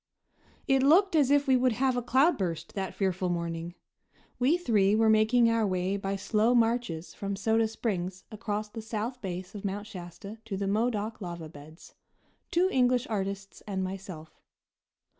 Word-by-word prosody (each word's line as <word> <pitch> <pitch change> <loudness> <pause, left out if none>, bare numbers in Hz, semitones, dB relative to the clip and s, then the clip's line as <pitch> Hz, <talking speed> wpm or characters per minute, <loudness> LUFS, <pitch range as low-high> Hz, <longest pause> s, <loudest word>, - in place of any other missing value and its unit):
It 270 -2 +4
looked 335 +7 +5
as 285 -4 +4
if 285 0 +4
we 265 - +4
would 250 -1 +3
have 255 +2 +1
a 245 - 0
cloudburst 230 - +1
that 190 -2 -4
fearful 185 -2 0
morning. 170 0 -3 0.6
We 270 +7 +3
three 210 - +2
were 220 0 +4
making 220 +2 +4
our 230 -2 +2
way 185 +1 0
by 195 0 -2
slow 215 +4 +2
marches 225 -8 0
from 200 0 -4
Soda 220 +3 +2
Springs 190 -5 -3
across 215 -1 -3
the 225 +2 -8
south 225 +3 -4
base 185 -1 -5
of 205 - -8
Mount 205 +1 -3
Shasta 200 +2 -9
to 200 -4 -4
the 200 0 -2
Modoc 215 +1 -1
lava 170 -3 -6
beds 150 +2 -14 0.6
two 355 +2 +3
English 250 -1 +3
artists 195 -1 -4
and 190 -2 -2
myself. 185 -4 -8
210 Hz, 160 wpm, -29 LUFS, 190-240 Hz, 0.6 s, looked